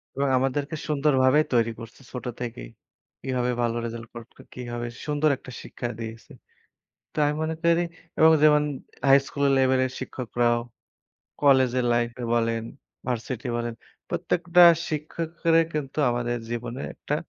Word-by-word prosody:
এবং 140 +1 0
আমাদেরকে 140 +4 -1
সুন্দরভাবে 140 -2 +3
তৈরি 115 -1 +3
করছে 115 +3 -11
ছোট 125 - -6 0.2
থেকেই। 110 - -6 0.5
কিভাবে 125 -1 -1
ভালো 115 -1 0
রেজাল্ট 115 0 -6
করবে? 120 -1 -11
কিভাবে 120 -1 -5 0.2
সুন্দর 150 +1 +1
একটা 130 - -12
শিক্ষা 120 - -6
দিয়েছে। 115 -1 -8 0.8
তো - - -19
আমি 145 +1 +1
মনে 160 0 -1
করি 170 0 +3 0.4
এবং 160 0 +7
যেমন 150 -1 +6 0.5
হাই 135 0 +8
স্কুল 140 +1 -2
লেভেলের 130 -1 +2
শিক্ষকরাও, 120 -2 0 0.8
কলেজের 130 -3 +4
লাইফে 120 +1 -1
বলেন, 115 -1 0 0.4
ভার্সিটি 125 +1 -3
বলেন, 120 -1 -3 0.4
প্রত্যেকটা 175 +1 +2 0.3
শিক্ষকেরে 165 +2 0
কিন্তু 150 -1 -4
আমাদের 120 0 -1
জীবনে 120 +2 -4
একটা 145 - -3
130 Hz, 130 wpm, -25 LUFS, 120-150 Hz, 0.8 s, হাই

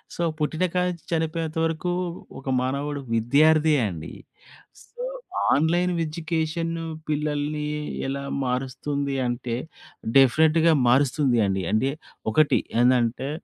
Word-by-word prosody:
So, - - -4 0.2
పుట్టినకాడి 180 +4 0
నుంచి 170 - -11
చనిపోయేంత 160 0 -1
వరకూ, 165 +2 -1 0.5
ఒక 135 0 -6
మానవుడు 140 +3 -2
విద్యార్దే 150 +7 +4
అండి. 80 -4 -7 0.7
సో, 485 - -12 0.5
ఆన్‌లైన్ 175 +4 +2
ఎడ్యుకేషన్ 165 +1 -2 0.4
పిల్లల్ని 150 0 -1 0.4
ఎలా 140 +1 -3 0.2
మారుస్తుంది 135 +2 -2
అంటే, 120 -1 -3 0.6
డెఫినిట్‌గా 160 +5 +5
మారుస్తుందండి. 120 -7 +2
అంటే 130 +6 +2 0.4
ఒకటి 155 +5 +4 0.2
ఎందంటే... 125 +1 +2
150 Hz, 95 wpm, -24 LUFS, 130-160 Hz, 0.7 s, డెఫినిట్‌గా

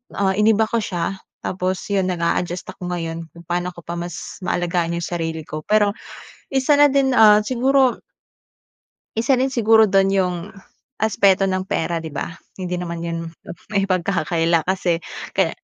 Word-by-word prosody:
ah, 195 -1 +2
iniba 220 +1 +4
ko 235 - 0
siya, 180 0 -2 0.3
tapos 185 0 -2
yun 195 -2 +1
naga-adjust 175 0 -1
ako 180 0 -6
ngayon 165 -1 -4
kung 170 0 -14
paano 175 +1 -1
ko 170 - -12
pa 170 - -5
mas 175 -1 -6
maalagaan 175 -1 0
yung 170 - -3
sarili 165 -2 -3
ko. 155 0 -6
Pero 210 -1 +3 0.6
isa 270 +2 +3
na 290 - +8
din 270 -1 +2
ah, 210 -1 +7
siguro, 260 +2 +2 1.2
isa 230 +4 +2
rin 265 +1 +1
siguro 225 -2 +5
dun 195 0 +4
iyong 180 -1 -1 0.5
aspeto 200 -2 +3
ng 185 0 -1
pera 170 -1 -1
'di 160 - -6
ba? - - -3 0.3
Hindi 180 -1 -3
naman 170 -1 -5
iyon 165 0 -3 0.5
maipagkakakila 170 -4 +1
kasi 180 -3 +1 0.4
kaya - - +3
185 Hz, 155 wpm, -21 LUFS, 170-210 Hz, 1.2 s, na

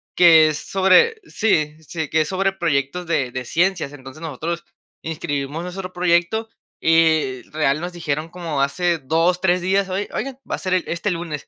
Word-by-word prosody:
que 160 -3 +7
es 150 - -3
sobre 195 - +3
sí, 155 -9 +1
sí, 160 0 -4
que 160 - +3
es 155 - -1
sobre 195 +1 +1
proyectos 170 -1 -1
de 135 -7 0
de 130 0 -5
ciencias. 175 -1 0
Entonces, 135 +2 -11
nosotros 165 +2 -4 0.4
inscribimos 145 -1 -3
nuestro 180 +1 -6
proyecto, 180 +5 +1 0.3
y 160 -5 +3
real, 150 -1 0
nos 175 +1 -5
dijeron 155 -2 -3
como 165 -5 -3
hace 170 +5 +1
2, 165 +6 +1
3 180 -1 +2
días: 190 +2 +1
"Oi 190 +2 -2
oigan, 260 +2 -4
va - - -2
a - - -8
ser 185 -1 0
el 185 - +1
este, 170 +4 -2
lunes". 165 -5 -4
170 Hz, 180 wpm, -21 LUFS, 150-180 Hz, 0.4 s, que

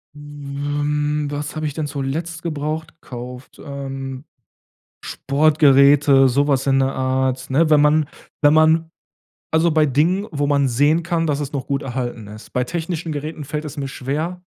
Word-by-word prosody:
Hm, 145 +1 -3
was 145 +1 -5
habe 155 - -3
ich 145 - -5
denn 155 -1 -3
zuletzt 155 +4 -4
gebraucht 155 0 -4
gekauft, 125 +1 -9
ähm? 135 -1 -6 0.8
Sportgeräte, 140 -1 +4
so 140 +4 +1
was 135 -1 +1
in 135 0 +3
der 135 0 +1
Art, 130 0 -1
ne? 155 +4 +2
Wenn 150 -1 +5
man 150 0 +3 0.3
wenn 145 0 +5
man 160 +1 +4 0.6
also, 160 +2 +3
bei 155 -1 +3
Dingen, 165 +9 +1
wo 145 -1 -1
man 140 -2 +2
sehen 145 +7 +2
kann, 170 -1 -1
dass 145 -2 0
es 145 0 -5
noch 135 - -4
gut 140 0 -1
erhalten 120 -3 -4
ist. 105 +2 -12
Bei 125 - +1
technischen 165 +3 -4
Geräten 150 +1 -5
fällt 150 +2 -4
es 150 0 -8
mir 140 -1 -3
schwer, 155 +7 -4
145 Hz, 165 wpm, -20 LUFS, 135-155 Hz, 0.8 s, Wenn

